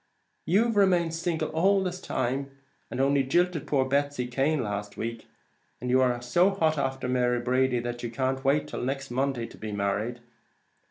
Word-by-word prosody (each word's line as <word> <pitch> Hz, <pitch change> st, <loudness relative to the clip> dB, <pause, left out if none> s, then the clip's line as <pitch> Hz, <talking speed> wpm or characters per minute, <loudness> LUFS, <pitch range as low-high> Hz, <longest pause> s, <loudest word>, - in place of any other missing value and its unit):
"You've 220 Hz, +5 st, +3 dB
remained 180 Hz, -4 st, +3 dB
single 165 Hz, 0 st, -1 dB
all 190 Hz, +5 st, +3 dB
this 185 Hz, 0 st, -4 dB
time, 135 Hz, -1 st, -2 dB, 0.4 s
and 125 Hz, -, -5 dB
only 140 Hz, +1 st, +3 dB
jilted 170 Hz, +3 st, +1 dB
poor 135 Hz, -3 st, +2 dB
Betsy 140 Hz, -1 st, 0 dB
Cane 135 Hz, +4 st, 0 dB
last 105 Hz, -1 st, -4 dB
week; 115 Hz, 0 st, -5 dB, 0.5 s
and 125 Hz, +1 st, -3 dB
are 130 Hz, -1 st, +4 dB
you 120 Hz, -, -8 dB
so 175 Hz, +10 st, +4 dB
hot 160 Hz, -6 st, +1 dB
after 135 Hz, -1 st, -2 dB
Mary 125 Hz, -1 st, +1 dB
Brady 125 Hz, +1 st, +1 dB
that 120 Hz, 0 st, -4 dB
you 120 Hz, -, -3 dB
can't 130 Hz, +2 st, -1 dB
wait 145 Hz, +2 st, +2 dB
till -, -, -5 dB
next 135 Hz, +1 st, -3 dB
Monday 130 Hz, -1 st, -1 dB
to -, -, -12 dB
be 110 Hz, -1 st, -5 dB
married? 105 Hz, +4 st, -1 dB
135 Hz, 175 wpm, -27 LUFS, 125-160 Hz, 0.5 s, are